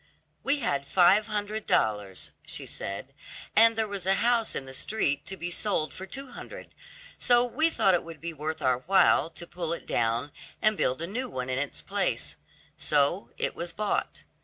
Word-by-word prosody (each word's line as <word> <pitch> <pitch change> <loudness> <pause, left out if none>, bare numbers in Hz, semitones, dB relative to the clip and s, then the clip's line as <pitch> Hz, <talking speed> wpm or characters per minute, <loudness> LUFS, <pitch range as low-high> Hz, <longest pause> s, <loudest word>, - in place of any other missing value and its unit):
"We 280 +1 +1
had 140 0 -1
five 195 +3 +5
hundred 210 +1 -3
dollars," 105 -3 0
she - - -4
said, 100 +8 -5 0.4
"and 230 +1 +7
there 220 -1 0
was 200 -3 -5
a 195 - +4
house 235 +1 +2
in 135 - -3
the 130 - -10
street 145 -3 0
to 190 - -5
be 175 +1 -4
sold 170 -5 0
for 190 - -8
two 270 +6 -6
hundred, - - -10 0.5
so 240 -1 +5
we 310 +7 +2
thought 195 - +3
it 175 - +2
would 165 -2 -10
be 170 0 -5
worth 155 +1 -4
our 130 -1 +2
while 180 +2 +4
to 170 - -8
pull 170 -1 -3
it - - -7
down 120 +5 0 0.3
and 215 0 +3
build 130 -3 0
a - - 0
new 245 +8 -4
one 130 - -4
in 130 - 0
its 145 0 -3
place; - - -1 0.4
so 150 +6 +2
it - - -1
was 170 0 -5
bought. 210 -1 -2
175 Hz, 190 wpm, -28 LUFS, 140-215 Hz, 0.5 s, and